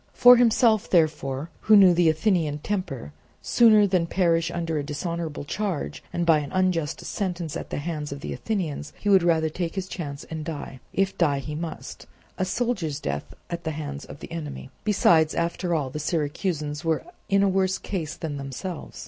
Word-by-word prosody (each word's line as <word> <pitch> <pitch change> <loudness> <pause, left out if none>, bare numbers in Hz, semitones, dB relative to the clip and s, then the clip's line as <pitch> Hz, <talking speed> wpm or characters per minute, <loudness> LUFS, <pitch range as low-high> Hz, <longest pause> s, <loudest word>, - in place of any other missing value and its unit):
For 245 0 +9
himself, 230 -2 +4
therefore, 155 -3 +1
who 215 - +5
knew 190 -3 +8
the 170 -1 +4
Athenian 160 -3 +1
temper, 150 - -4 0.3
sooner 220 -3 +5
than 185 -4 +1
perish 165 -2 +2
under 165 -2 -2
a - - -2
dishonourable 160 +1 -4
charge 165 - -3
and 175 - -1
by 165 -2 +5
an 145 -2 -6
unjust 185 -5 0
sentence 175 -6 -3
at - - -5
the - - -3
hands 150 -1 -4
of 140 0 -6
the - - -4
Athenians, 175 -9 -3
he 205 - -1
would 195 -2 +6
rather 165 -2 +2
take 165 +2 -4
his 190 -1 -3
chance 145 -5 -6
and 160 -1 -6
die, 145 -4 -6
if 195 0 0
die 150 -5 +3
he 145 +2 -5
must, 165 +2 -6 0.3
a 185 - +1
soldier's 185 - -1
death 75 - -4
at 170 0 -5
the 160 - -2
hand 145 -2 -5
of - - -10
the - - -9
enemy. 150 -5 -6
Besides, 165 -6 +4
after 170 +1 -1
all, 140 -5 -1
the 150 - -4
Syracusans 150 -1 -2
were 165 -1 0 0.3
in 195 0 +4
a - - +4
worse 190 0 +1
case 165 -6 -4
than 150 -3 -5
themselves. 140 +6 -6
165 Hz, 185 wpm, -25 LUFS, 150-185 Hz, 0.3 s, For